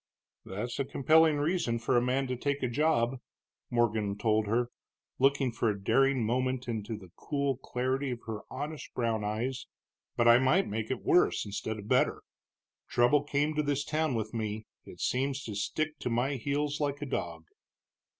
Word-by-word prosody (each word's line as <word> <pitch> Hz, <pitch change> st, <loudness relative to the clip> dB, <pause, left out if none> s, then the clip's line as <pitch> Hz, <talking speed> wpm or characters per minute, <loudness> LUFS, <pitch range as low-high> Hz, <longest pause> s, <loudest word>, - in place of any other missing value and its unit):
"That's 115 Hz, +6 st, -4 dB
a -, -, +2 dB
compelling 155 Hz, +3 st, +4 dB
reason 145 Hz, -5 st, 0 dB
for 115 Hz, +2 st, 0 dB
a 120 Hz, -, +5 dB
man 130 Hz, +2 st, +1 dB
to 130 Hz, -1 st, -2 dB
take 140 Hz, +2 st, -2 dB
a -, -, +2 dB
job," 130 Hz, -2 st, +1 dB, 0.5 s
Morgan 110 Hz, -4 st, +1 dB
told 110 Hz, 0 st, +1 dB
her, 120 Hz, +3 st, +1 dB, 0.5 s
looking 135 Hz, -1 st, +3 dB
for 115 Hz, 0 st, 0 dB
a 100 Hz, -1 st, -2 dB
daring 130 Hz, +4 st, +3 dB
moment 130 Hz, +2 st, 0 dB
into 110 Hz, -1 st, -3 dB
the 95 Hz, -4 st, -14 dB
cool 140 Hz, -3 st, -1 dB
clarity 130 Hz, +1 st, -2 dB
of 120 Hz, -2 st, -4 dB
her 110 Hz, -2 st, -4 dB
honest 145 Hz, +3 st, -6 dB
brown 115 Hz, -3 st, 0 dB
eyes. 120 Hz, +5 st, -2 dB, 0.5 s
"But 120 Hz, -, +3 dB
I 120 Hz, +1 st, +8 dB
might 155 Hz, +9 st, +3 dB
make 110 Hz, +1 st, -3 dB
it 130 Hz, -, -3 dB
worse 180 Hz, -, +3 dB
instead 105 Hz, +2 st, -4 dB
of 105 Hz, -1 st, -9 dB
better. -, -, +2 dB, 0.7 s
Trouble 120 Hz, +4 st, +4 dB
came 145 Hz, +1 st, 0 dB
to 150 Hz, -, +1 dB
this 145 Hz, -1 st, -1 dB
town 155 Hz, -4 st, 0 dB
with 110 Hz, 0 st, -3 dB
me; 110 Hz, -1 st, -3 dB, 0.2 s
it -, -, -12 dB
seems 135 Hz, +2 st, 0 dB
to 110 Hz, -, -5 dB
stick 150 Hz, +10 st, -2 dB
to -, -, -2 dB
my 120 Hz, +4 st, +1 dB
heels 145 Hz, +3 st, -1 dB
like 145 Hz, 0 st, -1 dB
a -, -, -3 dB
dog." 85 Hz, -, -4 dB
125 Hz, 180 wpm, -30 LUFS, 110-140 Hz, 0.7 s, I